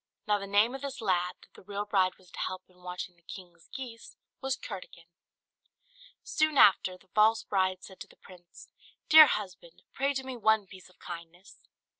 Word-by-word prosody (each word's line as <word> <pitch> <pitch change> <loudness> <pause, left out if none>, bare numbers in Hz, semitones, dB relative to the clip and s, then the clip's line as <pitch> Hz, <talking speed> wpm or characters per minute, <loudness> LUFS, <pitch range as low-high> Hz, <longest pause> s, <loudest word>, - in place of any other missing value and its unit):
Now 210 -1 +2
the 200 - -7
name 205 +5 +3
of 270 - -6
this 280 -1 -6
lad, 180 -4 0
that - - -22
the - - -15
real 200 +2 -5
bride 190 -3 +1
was 180 -2 -22
to - - -10
help 185 0 -4
in 180 -1 -25
watching 180 0 -7
the 170 - -30
king's 175 -1 -12
geese, 240 -4 -9 0.2
was 265 -1 -1
Curdken. 185 -5 -9 1.2
Soon 310 -2 0
after, 185 -4 +5
the 190 +1 -27
false 215 +3 +3
bride 185 -1 0
said 190 - -12
to - - -9
the - - -20
prince, 175 -2 -16 0.4
"Dear 310 -1 +10
husband 180 -7 -5
pray 275 +1 0
do 265 -1 -3
me 260 -1 -6
one 220 -2 +2
piece 190 -1 -14
of 185 - -25
kindness." 175 +2 -11
195 Hz, 190 wpm, -29 LUFS, 180-225 Hz, 1.2 s, Dear